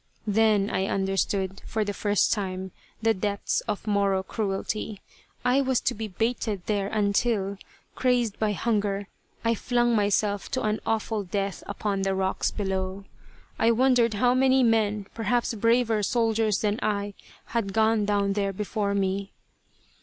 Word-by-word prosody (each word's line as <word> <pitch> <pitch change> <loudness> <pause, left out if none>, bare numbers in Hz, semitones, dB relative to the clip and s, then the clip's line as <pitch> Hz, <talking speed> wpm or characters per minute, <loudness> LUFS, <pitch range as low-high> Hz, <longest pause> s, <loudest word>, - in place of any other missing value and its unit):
Then 210 -1 +3
I 190 - 0
understood 195 0 -1
for 220 -2 -1
the 205 - -2
first 205 0 +2
time 190 -2 -4 0.3
the 225 0 +4
depths 200 0 -1
of 210 -2 -3
Moro 200 -2 +1
cruelty. 210 0 -3 0.5
I 250 +3 +4
was 260 -2 +1
to - - 0
be 220 +1 -5
baited 215 -1 -2
there 205 -2 0
until, 200 -1 0 0.3
crazed 245 -4 +1
by 215 -1 +1
hunger, 205 -2 -1 0.4
I 230 - +4
flung 240 +1 +1
myself 205 -1 +1
to 260 - 0
an 215 0 0
awful 220 -1 0
death 195 +1 -3
upon 205 -1 -2
the 195 0 0
rocks 190 0 0
below. 190 -1 -3 0.6
I 225 - +4
wondered 235 -2 +3
how 245 +4 +3
many 260 0 +4
men, 215 -3 +2
perhaps 240 +1 0
braver 230 0 +2
soldiers 225 -1 +1
than 210 0 0
I, 205 -1 -1 0.4
had 225 -5 0
gone 220 +1 +3
down 200 -1 +1
there 200 -1 -1
before 205 0 -2
me. 195 0 -1
210 Hz, 145 wpm, -26 LUFS, 200-225 Hz, 0.6 s, the